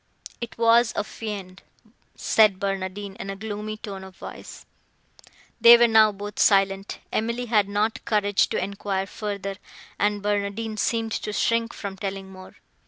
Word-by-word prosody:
"It 235 - -6
was 230 0 +4
a - - 0
fiend," 200 -4 -7 0.5
said 210 -4 +3
Barnardine 195 0 -3
in 195 - -6
a 195 - -4
gloomy 215 +1 -5
tone 195 -3 -7
of 190 -1 -12
voice. - - -10 1.0
They 235 +1 +10
were 240 0 +5
now 220 -1 +6
both 205 +1 -8
silent;—Emily 200 +4 +1
had 210 -4 +2
not 210 +2 -1
courage 205 -2 +2
to - - -1
enquire 195 0 -2
further, 200 +1 -5 0.4
and 205 0 0
Barnardine 205 +2 -2
seemed 225 +1 0
to 210 - -3
shrink 230 +2 +1
from 195 -2 -7
telling 195 0 -5
more. 185 0 -13
205 Hz, 145 wpm, -24 LUFS, 195-220 Hz, 1.0 s, They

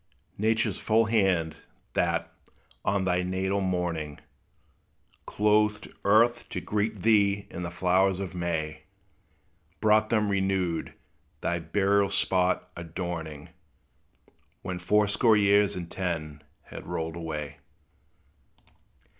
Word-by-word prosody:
Nature's 110 +1 +1
full 115 +1 +3
hand, 95 -7 +1 0.4
that, - - 0 0.5
on 95 -1 +1
thy 90 -1 +1
natal 95 +2 -1
morning, 85 -5 -2 1.1
Clothed 105 0 +2
earth 120 +4 +3
to - - -3
greet 105 -2 -2
thee 100 -2 +3
in 85 - -6
the 85 - -3
flowers 95 +2 +2
of 95 -1 -5
May, 80 -3 -3 0.9
Brought 110 0 +3
them 105 -3 +1
renewed; 95 -4 -1 0.5
thy 85 - -1
burial 100 +4 +2
spot 90 -2 +1
adorning, 80 -2 -6 1.1
When 95 -1 -4
fourscore 105 +4 +3
years 100 0 +4
and 90 -2 -5
ten 80 -5 -3 0.2
had - - -10
rolled 80 0 -3
away. 80 -3 -5
95 Hz, 105 wpm, -27 LUFS, 85-105 Hz, 1.1 s, years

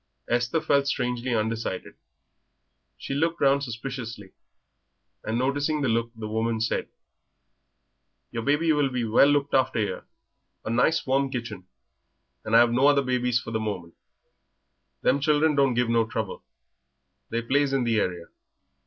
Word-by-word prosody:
Esther 120 +6 +1
felt 140 -3 +2
strangely 125 -2 -1
undecided. 110 -3 -3 1.0
She - - -5
looked 165 +4 0
round 140 0 +3
suspiciously, 115 -5 -6 0.9
and 110 +2 -2
noticing 145 +4 0
the 135 - +1
look 115 +1 0
the 110 -1 -6
woman 110 +1 -1
said 110 - -1 1.4
"Your 115 - -3
baby 150 +5 +2
will 145 -2 +2
be 125 -2 -2
well 115 +5 +5
looked 145 -1 +1
after 130 -2 +2
'ere; 105 -4 -2 0.6
a 110 - -2
nice 125 +7 +2
warm 135 +1 +1
kitchen, 110 -7 -6 0.8
and 110 +1 0
I've 120 0 +6
no 130 +4 +4
other 145 -1 +4
babies 125 -1 +1
for 115 - -8
the 110 - -1
moment; 100 -6 -5 1.1
them 140 - +3
children 150 +2 +3
don't 135 -3 +2
give 120 0 +1
no 115 -1 +2
trouble, 110 -3 -4 0.9
they 115 +1 -2
plays 140 +3 +1
in 135 -2 +1
the 115 -2 +1
area. 90 -4 -2
125 Hz, 145 wpm, -26 LUFS, 115-140 Hz, 1.4 s, I've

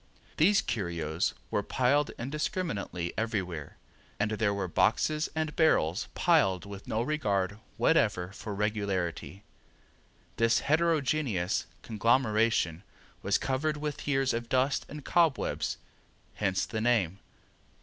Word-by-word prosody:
These 195 +6 +4
curios 85 -7 -2 0.2
were 105 - +1
piled 135 +7 +2
indiscriminately 140 - -3
everywhere, 95 -9 -3 0.4
and 105 +1 +1
there 110 -1 +1
were 100 -2 -2
boxes 155 - +1
and 155 -1 -2
barrels 100 - +2
piled 120 - +3
with 100 0 -9
no 110 +2 0
regard 105 -9 -1 0.2
whatever 90 +1 +2
for 105 0 -6
regularity. 100 -2 -2 0.9
This 115 0 +3
heterogeneous 150 - +1 0.2
conglomeration 110 -6 +2 0.4
was - - +2
covered 150 +3 -1
with 150 -1 -5
years 135 -2 +2
of 115 0 -3
dust 130 +2 +1
and 150 -1 -8
cobwebs, 165 -7 +1 0.6
hence 95 -2 0
the 110 -2 -4
name. 105 -6 +1
110 Hz, 110 wpm, -29 LUFS, 95-145 Hz, 0.9 s, These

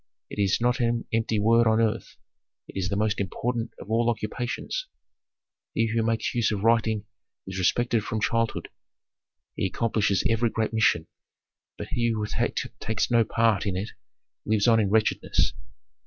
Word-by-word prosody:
It - - -6
is 100 -2 +2
not 125 +2 +1
an 120 -1 0
empty 115 -1 +1
word 115 +2 +4
on 110 0 +3
earth, 115 0 -1 0.5
it - - -13
is 95 -1 -1
the 100 - -1
most 105 +1 0
important 115 +5 -2
of 100 - -9
all 115 +1 +3
occupations. 120 - -3 0.9
He 115 0 +1
who 115 - +2
makes 115 0 0
use 120 -3 +1
of 105 -1 -2
writing 110 -2 +2 0.4
is 95 0 -5
respected 115 +4 +2
from 110 - -2
childhood; 115 +1 0 0.9
he - - 0
accomplishes 105 -1 +1
every 115 +1 +2
great 110 0 -2
mission. 110 -7 +3 0.7
But - - -6
he 120 -1 0
who 110 -2 -1 0.5
takes 110 +2 -1
no 115 -1 +5
part 110 -3 +1
in 95 -2 -1
it 100 +4 -4 0.5
lives 105 0 +1
on 115 -1 +5
in 105 -3 +1
wretchedness. 110 +1 +2
110 Hz, 160 wpm, -26 LUFS, 105-115 Hz, 0.9 s, no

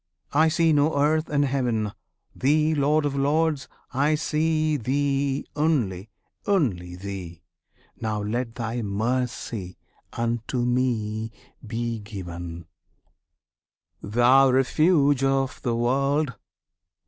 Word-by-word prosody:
I 155 +3 +5
see 160 0 +3
no 145 0 +2
Earth 155 +2 +2
and 145 -1 +2
Heaven! 120 -6 0 0.4
Thee, 155 +4 +2
Lord 150 +1 +2
of 140 -1 -1
Lords! 145 +1 +1 0.3
I 145 +4 +2
see, 155 0 +1
Thee 140 +1 0
only 115 - 0 0.4
only 100 - 0
Thee! 90 -3 -7 0.5
Now 110 -2 -2
let 115 +2 -3
Thy 115 +1 -3
mercy 110 -2 -2 0.4
unto 115 +1 -1
me 115 -3 0 0.3
be 115 0 -3
given, 85 -5 -7 1.4
Thou 120 +5 +5
Refuge 140 +1 +3
of 135 0 0
the 120 -2 -1
World! 135 +4 +1
130 Hz, 100 wpm, -25 LUFS, 110-145 Hz, 1.4 s, I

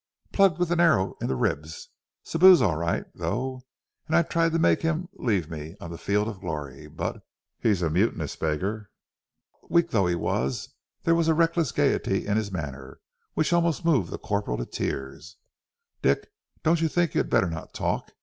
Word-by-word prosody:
"Plugged... 195 -5 +4
with 175 -1 0
an 175 - +1
arrow... 155 - +3
in - - -1
the 65 - 0
ribs. 75 +5 -2 0.3
Sibou's 180 +1 +7
all 95 -10 +2
right, 85 +2 -1
though. 130 -1 -3 0.5
And 155 - +1
I 170 - +5
tried 165 0 +1
to - - +2
make 165 - +3
him... 165 +2 -1
leave 100 -10 0
me... 80 +1 -7
on 85 - -8
the 85 - -6
field 105 +1 0
of 105 -4 -6
glory. 75 -7 -6
B - - -18
but - - -3 0.4
he's 100 -6 +1
a 80 - +2
mutinous 95 +8 0
beggar." 100 +7 -2 0.8
Weak 170 0 +3
though 100 -5 +3
he 90 - +1
was, 65 -5 -2 0.3
there 165 - +3
was 165 -1 +2
a 160 - +4
reckless 165 -3 +2
gaiety - - +1
in 105 - 0
his 110 -2 -1
manner, 70 -6 -6 0.4
which 155 +1 +1
almost 170 -1 +1
moved 130 - +3
the - - -5
corporal 100 -12 -2
to - - -3
tears. 70 +7 -5 0.6
"Dick, - - +1 0.3
don't 165 +1 +3
you 165 - +3
think 170 0 0
you - - +2
had - - -1
better 90 - +2
not 80 -1 -7
talk? - - -2
105 Hz, 190 wpm, -26 LUFS, -, 0.8 s, Sibou's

